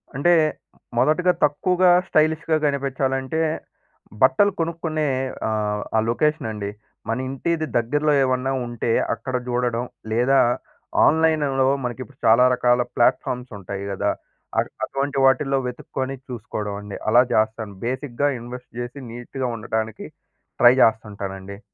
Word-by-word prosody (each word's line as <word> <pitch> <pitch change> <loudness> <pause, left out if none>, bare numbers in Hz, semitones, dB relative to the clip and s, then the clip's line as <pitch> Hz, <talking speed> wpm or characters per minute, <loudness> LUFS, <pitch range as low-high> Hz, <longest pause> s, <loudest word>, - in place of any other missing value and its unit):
అంటే 175 +6 +4 0.6
మొదటగా 155 +8 +3
తక్కువగా 180 +5 +3 0.2
స్టైలిష్‌గా 155 +1 +2
కనిపిచ్చాలంటే 135 +1 -1 0.8
బట్టలు 135 +11 +5
కొనుక్కునే 160 -2 -1 0.4
ఆహ్, 105 -1 -1
ఆ - - +5
లొకేషన్ 150 -1 +1
అండి. 100 -1 -4 0.4
మన 115 - 0
ఇంటిది 155 +4 -1
దగ్గరలో 145 +6 +1
ఏమన్నా 130 +1 0 0.2
ఉంటే 120 -1 -2 0.2
అక్కడ 125 +3 -5
చూడడం, 120 0 0 0.3
లేదా 130 +4 +3 0.7
ఆన్లైన్‌లో 150 -4 +3 0.2
మనకి 125 +1 -4
ఇప్పుడు 140 0 -19
చాలా 115 +3 +6
రకాల 125 0 +3
ప్లాట్‌ఫామ్స్ 125 +1 +1
ఉంటాయి 100 +1 -6
గదా, 100 +1 0 0.5
అట్ - - -1
అటువంటి 140 0 -3
వాటిల్లో 135 +1 +3
వెతుక్కొని 130 +2 -4
చూసుకోవడం 105 -3 -5
అండి 105 -1 -7
అలా 120 +3 +6
చేస్తాను. 110 -1 0
బేసిక్‌గా 130 +2 -1
ఇన్వెస్ట్ 125 +1 -9
చేసి 120 +3 -6
నీట్‌గా 120 +2 -4
ఉండటానికి 110 0 -3 0.5
ట్రై 120 +1 +8
చేస్తుంటానండి. 100 -3 -2
125 Hz, 115 wpm, -22 LUFS, 115-145 Hz, 0.8 s, ట్రై